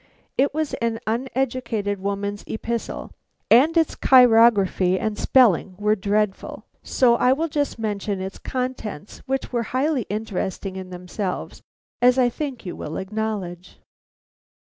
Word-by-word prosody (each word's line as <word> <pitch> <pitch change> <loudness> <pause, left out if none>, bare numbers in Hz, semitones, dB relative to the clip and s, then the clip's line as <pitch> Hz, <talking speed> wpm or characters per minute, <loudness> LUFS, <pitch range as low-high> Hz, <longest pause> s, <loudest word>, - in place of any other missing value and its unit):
It 280 +2 +2
was 310 0 -2
an 230 -1 -1
uneducated 235 -4 -2
woman's 200 +1 -3
epistle 230 +1 -4 0.4
and 295 +9 +6
its 325 -2 +3
chirography 225 -7 +5
and 215 -1 -2
spelling 205 -7 +3
were 210 +1 +2
dreadful; 205 0 -2 0.2
so 240 -2 +3
I 250 - +4
will 320 +5 -1
just 290 -2 -2
mention 205 -2 -3
its 190 +1 -6
contents, 250 - -5
which 270 -1 -2
were 240 - +1 0.2
highly 275 -4 0
interesting 195 -2 -3
in 190 -1 -7
themselves, 180 +1 -5 0.4
as 250 +1 +5
I 250 -2 +4
think 270 -2 -5
you 180 - -5
will 150 - -6
acknowledge. 190 -3 -4
220 Hz, 130 wpm, -23 LUFS, 195-255 Hz, 0.4 s, and